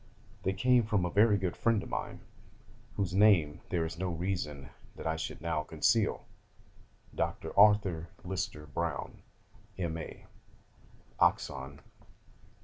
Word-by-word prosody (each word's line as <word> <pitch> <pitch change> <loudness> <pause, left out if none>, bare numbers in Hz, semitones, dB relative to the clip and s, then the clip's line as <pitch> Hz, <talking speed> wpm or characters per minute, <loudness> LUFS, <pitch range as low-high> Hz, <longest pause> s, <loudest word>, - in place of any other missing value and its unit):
They 95 - 0
came 125 +5 +4
from 105 -5 0
a 90 - -2
very 105 +2 +5
good 90 -2 -2
friend 115 -3 +1
of - - -9
mine, - - -4 0.7
whose 95 -3 -1
name 90 -7 +4
there 85 -3 0
is 80 +1 -6
no 95 -1 -1
reason 80 -5 -3 0.2
that - - -9
I 80 0 0
should 80 - -5
now 80 -2 -1
conceal - - +1 0.9
Dr. - - -3
Arthur 100 -5 +4
Lister 95 -4 -4
Browne, 70 -2 -4 0.6
M.A. 85 -3 -5 0.9
(Oxon.) 65 +2 0
90 Hz, 125 wpm, -31 LUFS, 80-100 Hz, 0.9 s, very